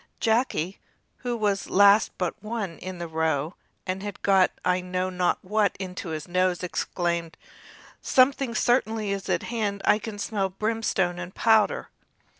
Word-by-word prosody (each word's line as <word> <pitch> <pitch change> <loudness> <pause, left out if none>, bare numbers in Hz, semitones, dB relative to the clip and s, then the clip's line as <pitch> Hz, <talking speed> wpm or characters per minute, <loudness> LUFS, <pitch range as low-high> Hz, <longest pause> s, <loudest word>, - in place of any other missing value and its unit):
Jacky, 220 -6 0 0.4
who 245 -1 -3
was 205 -3 0
last 200 +2 +5
but 180 -2 -1
one 215 -5 -4
in 185 0 -6
the 170 0 -5
row, 160 -1 -1 0.3
and 185 0 -3
had 205 -1 -6
got 190 -2 +5 0.2
I 180 0 +2
know 185 +1 -2
not 180 -1 +1
what 210 +1 +1
into 185 -1 -5
his 155 0 -5
nose, 185 0 +1
exclaimed: 170 -2 -2 0.6
"Something 255 -2 +3
certainly 220 -4 +1
is 195 -1 -4
at - - +1
hand, 210 -4 -2
for - - +6
I 210 - +2
can 220 -2 -7
smell 200 -2 -1
brimstone 195 -3 -1
and 180 +1 -7
powder!" 220 -2 +3
195 Hz, 155 wpm, -26 LUFS, 180-220 Hz, 0.6 s, for